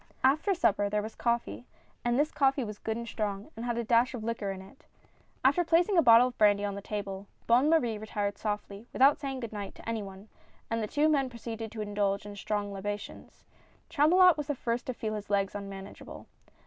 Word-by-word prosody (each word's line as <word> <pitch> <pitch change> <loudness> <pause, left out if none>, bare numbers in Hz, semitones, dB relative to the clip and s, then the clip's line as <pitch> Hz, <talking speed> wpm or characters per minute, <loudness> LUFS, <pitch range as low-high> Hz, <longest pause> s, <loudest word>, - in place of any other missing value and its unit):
After 310 +9 +3
supper 330 - +2
there 210 0 0
was 220 +1 -6
coffee, 180 - -2 0.4
and 240 0 +1
this 295 +2 +2
coffee 270 -1 +2
was 210 -2 -7
good 220 0 -3
and 235 0 -6
strong, 210 +2 -4
and 225 - -6
had 240 -1 -1
a 235 - -1
dash 235 +3 +2
of 225 - -6
liquor 220 -3 -3
in 195 -1 -4
it. 190 +8 -15 0.6
After 290 +7 +4
placing 340 +4 +3
a 340 - +6
bottle 240 -1 +7
of 245 - -15
brandy 205 -1 +4
on 200 - -2
the 200 - -6
table, 200 -1 -5 0.2
Bonne 250 +6 +4
Marie 240 -10 +2
retired 205 -2 -3
softly, 210 0 -4
without 275 +3 +5
saying 270 -3 -4
good 230 -2 -6
night 205 -2 -6
to - - -13
any 230 -1 -1
one, 195 +1 -10 0.4
and 225 0 0
the 215 - -2
two 295 +6 +2
men 280 -4 +2
proceeded 230 -2 -6
to 225 -1 -6
indulge 205 -1 -1
in 205 0 -8
strong 205 0 -3
libations. 205 +1 -7 0.5
Chamulot 335 +3 +5
was 295 -1 -4
the 290 - -1
first 240 -1 -3
to 255 - -2
feel 220 -3 -3
his 210 -1 -6
legs 200 -1 +1
unmanageable. 195 -1 -8
225 Hz, 210 wpm, -29 LUFS, 205-265 Hz, 0.6 s, bottle